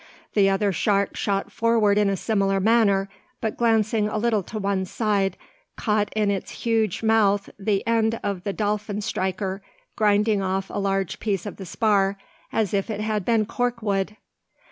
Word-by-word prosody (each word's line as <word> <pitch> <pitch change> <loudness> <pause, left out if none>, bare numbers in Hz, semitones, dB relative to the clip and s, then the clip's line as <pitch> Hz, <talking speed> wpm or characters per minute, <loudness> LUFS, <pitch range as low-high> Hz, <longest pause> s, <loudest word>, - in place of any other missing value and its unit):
The 200 -2 +4
other 195 +1 +1
shark 200 +2 +1
shot 195 -1 -1
forward 225 -3 +3
in 205 -1 +3
a 195 - 0
similar 195 -1 +1
manner; 200 -2 +3 0.3
but 220 - -2
glancing 220 -2 +2
a 215 - -2
little 220 -1 +1
to 215 +4 -7
one 195 -2 0
side, 200 -2 0 0.4
caught 210 -2 0
in 210 -2 +2
its 195 -2 -3 0.2
huge 225 -3 +1
mouth 205 -3 +2
the 200 0 0
end 225 0 +1
of 200 -3 -2
the 200 - -1
dolphin 210 0 -2
striker, 190 -1 -2 0.3
grinding 210 0 +2
off 190 0 -2
a - - -2
large 195 -2 -1
piece 200 -5 -2
of 205 - -6
the 190 - -8
spar 200 0 +2 0.3
as 215 -4 0
if 200 +2 0
it 210 -1 -3
had 215 -2 -1
been 225 +1 +2
cork 245 +1 -2
wood! 200 0 -1
205 Hz, 170 wpm, -24 LUFS, 195-220 Hz, 0.4 s, The